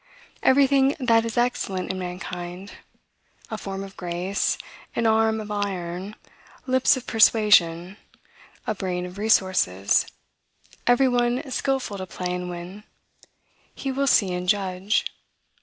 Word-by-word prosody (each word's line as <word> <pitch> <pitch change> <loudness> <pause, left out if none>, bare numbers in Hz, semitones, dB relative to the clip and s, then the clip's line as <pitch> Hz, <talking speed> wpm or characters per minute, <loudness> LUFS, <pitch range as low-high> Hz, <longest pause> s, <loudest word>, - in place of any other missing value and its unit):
Everything 275 +1 +4
that 230 -3 +3
is 230 0 -5
excellent 240 -6 0
in 190 - -5
mankind, 180 +1 -6 0.8
a 220 - -3
form 195 0 -5
of 195 -1 -11
grace, 180 +2 -1 0.4
an 235 - 0
arm 220 0 +3
of 210 -1 -7
iron, 195 -1 -3 0.5
lips 260 +1 +3
of 255 - -8
persuasion, 205 -5 +4 0.7
a 215 - 0
brain 180 -3 -3
of 180 +2 -9
resources, 185 - +2 0.8
every 245 +2 +5
one 245 +1 0
skilful 260 -6 -1
to 185 - -5
play 180 0 -4
and 180 0 -4
win, 180 +4 -8 0.9
he 270 - -3
will 275 +1 0
see 195 -8 +3
and 180 0 -3
judge. 195 0 +1
200 Hz, 125 wpm, -24 LUFS, 180-235 Hz, 0.9 s, every